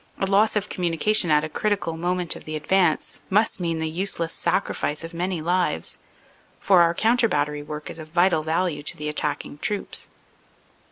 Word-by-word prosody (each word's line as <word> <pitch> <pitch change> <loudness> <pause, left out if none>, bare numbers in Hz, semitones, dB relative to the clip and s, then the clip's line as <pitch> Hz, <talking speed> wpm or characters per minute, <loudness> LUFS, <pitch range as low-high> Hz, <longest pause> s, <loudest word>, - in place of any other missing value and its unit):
A - - 0
loss 200 +3 +3
of 210 -1 0
communication 175 +2 +1
at 150 0 +4
a - - -2
criti 205 +6 0
cal 165 -3 -4
moment 175 +1 -1
of - - -11
the 155 - -5
advance 160 +1 +1
must 210 +1 +2
mean 165 -2 -1
the 160 0 -1
useless 170 0 -1
sacrifice 150 +2 -1
of 165 +1 -7
many 175 0 -2
lives, 175 - 0 0.6
for 185 -3 +5
our 170 0 +3
counter 230 +3 +3
battery 150 -7 -1
work 150 +1 -7
is 165 - -8
of 155 - -8
vital 175 0 +3
value 160 0 -1
to 145 - +1
the 150 0 -3
attacking 150 -1 -3
troops. 205 +3 -3
170 Hz, 180 wpm, -24 LUFS, 155-190 Hz, 0.6 s, for